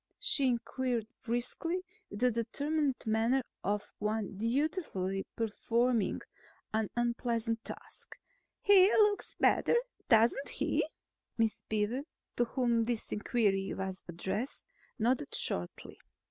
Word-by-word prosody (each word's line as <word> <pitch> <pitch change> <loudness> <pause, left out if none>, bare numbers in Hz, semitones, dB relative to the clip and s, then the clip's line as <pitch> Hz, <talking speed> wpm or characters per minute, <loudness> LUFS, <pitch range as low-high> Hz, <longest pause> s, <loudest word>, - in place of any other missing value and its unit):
she 415 -10 +1
inquired 245 -1 0 0.2
briskly 255 +9 -2 0.3
with 205 - -7
the 250 0 +5
determined 280 +5 0
manner 225 +4 +2 0.2
of 205 +1 0 0.2
one 210 -1 -1
dutifully 230 - -1
performing 230 0 +1 0.5
an 220 -1 +1
unpleasant 235 -1 0
task. - - -9 0.5
"He 395 0 +7
looks 415 -1 +3
better, - - +4 0.3
doesn't 235 +4 +4
he?" - - 0 0.5
Miss 225 -2 +1
Beaver, 220 +4 0 0.4
to 240 - +4
whom 235 -2 +1
this 235 -1 -2
inquiry 205 -3 +1
was 190 0 -3
addressed, 190 +9 -3 0.3
nodded 240 - +1
shortly. 90 0 -3
235 Hz, 105 wpm, -32 LUFS, 215-260 Hz, 0.5 s, He